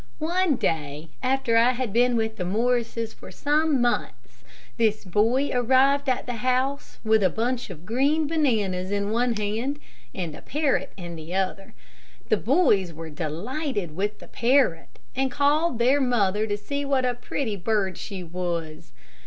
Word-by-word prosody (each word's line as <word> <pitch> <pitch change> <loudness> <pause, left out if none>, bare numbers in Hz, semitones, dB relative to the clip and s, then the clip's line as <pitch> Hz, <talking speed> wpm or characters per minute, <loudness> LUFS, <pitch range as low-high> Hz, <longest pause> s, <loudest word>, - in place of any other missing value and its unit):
One 345 0 +1
day, 155 - -2
after 260 -3 +1
I 240 +2 +5
had 245 -4 -3
been 245 +1 +3
with 220 -1 -1
the 180 - -2
Morrises 230 +3 0
for - - -12
some 300 -1 +1
months, 240 0 -2 0.3
this 220 -2 +1
boy 225 +9 +2
arrived 265 +3 +3
at 255 0 0
the 245 -2 -4
house 255 +2 0
with 220 -1 +3
a 190 - +4
bunch 240 +4 -2
of 175 -2 -10
green 280 +8 +2
bananas 220 - 0
in 200 0 -1
one 240 +1 +1
hand, 220 +7 -2 0.4
and 170 -5 -4
a - - -11
parrot 295 -1 0
in 175 -2 -7
the 160 +3 -7
other. 195 0 -2 0.5
The 215 - +4
boys 210 - +3
were 160 0 -8
delighted 180 - -3
with 205 +3 -2
the - - -13
parrot, 240 -9 +1 0.2
and 265 +1 +1
called 290 +1 +2
their 260 +5 +3
mother 215 -4 +1
to 205 -1 -1
see 280 +7 -3
what 275 -2 +1
a 250 - +1
pretty 240 -2 -3
bird 195 0 0
she 195 -3 -6
was. 165 - -4
230 Hz, 160 wpm, -25 LUFS, 190-265 Hz, 0.5 s, I